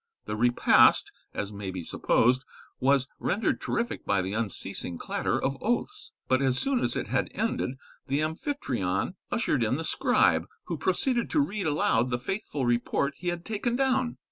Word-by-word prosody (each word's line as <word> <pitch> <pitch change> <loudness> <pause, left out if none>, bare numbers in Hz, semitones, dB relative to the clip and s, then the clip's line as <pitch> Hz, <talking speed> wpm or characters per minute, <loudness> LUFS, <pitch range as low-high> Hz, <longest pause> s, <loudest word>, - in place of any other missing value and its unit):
The 105 - -3
repast, 120 +2 +5 0.2
as 100 +1 -4
may 100 -1 -5
be 90 -2 -5
supposed, 125 +9 +2 0.4
was 135 0 +3
rendered 215 +4 0
terrific 235 0 -2
by 100 -2 +1
the 95 +2 -3
unceasing 100 -5 -3
clatter - - -1
of 135 0 -2
oaths, 415 - -2 0.2
but 130 +1 +3
as 130 -2 +2
soon 270 - +1
as - - 0
it - - -2
had - - 0
ended, 175 - -1 0.3
the 140 +2 +1
Amphytrion 160 - -1 0.2
ushered - - +1
in - - +1
the - - -3
scribe, - - +2 0.2
who - - -4
proceeded 250 -4 +1
to 310 - +2
read 210 - 0
aloud 145 -4 +2
the 120 - 0
faithful 145 0 -3
report 120 +4 +1
he 180 - -7
had 175 -1 -2
taken 225 +2 -1
down. 255 -2 +1
140 Hz, 170 wpm, -28 LUFS, -, 0.4 s, repast